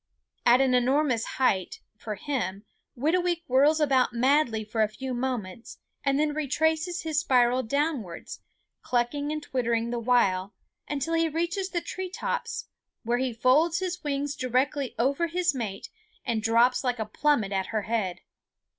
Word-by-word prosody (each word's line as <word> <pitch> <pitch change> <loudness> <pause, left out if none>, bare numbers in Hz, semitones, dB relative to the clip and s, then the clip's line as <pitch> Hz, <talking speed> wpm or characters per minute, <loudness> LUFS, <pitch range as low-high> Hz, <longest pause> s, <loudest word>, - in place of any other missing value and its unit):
At 245 +2 +6
an 265 -1 +3
enormous 250 -1 +2
height, 195 -9 +1 0.2
for 215 0 -6
him, 205 -5 -3 0.3
Whitooweek 345 +5 +1
whirls 285 +5 +4
about 265 -5 +3
madly 245 -2 +2
for 220 +1 -2
a 215 - +4
few 260 +4 -5
moments 240 -5 -4 0.3
and 275 -1 +2
then 300 0 +1
retraces 320 +4 0
his 315 -2 0
spiral 250 -4 +3
downwards, 260 - -3 0.4
clucking 270 +4 -1
and 305 -1 -3
twittering 235 -4 -1
the 240 - -2
while, 200 -5 +1 0.3
until 295 +3 -2
he 330 0 +2
reaches 345 +5 -2
the 345 -2 -2
tree 375 +2 -5
tops, 375 - -3 0.4
where 240 +1 0
he 260 -1 0
folds 265 +9 +3
his 360 -1 -3
wings 285 0 -2
directly 260 +2 -1
over 280 +8 +1
his 345 -1 +1
mate 215 -7 -5 0.4
and 225 -2 0
drops 235 +3 +3
like 250 -1 0
a 220 - -2
plummet 220 -2 +1
at 190 -1 -1
her 215 -2 -2
head. 210 -5 -2
260 Hz, 155 wpm, -27 LUFS, 230-305 Hz, 0.4 s, At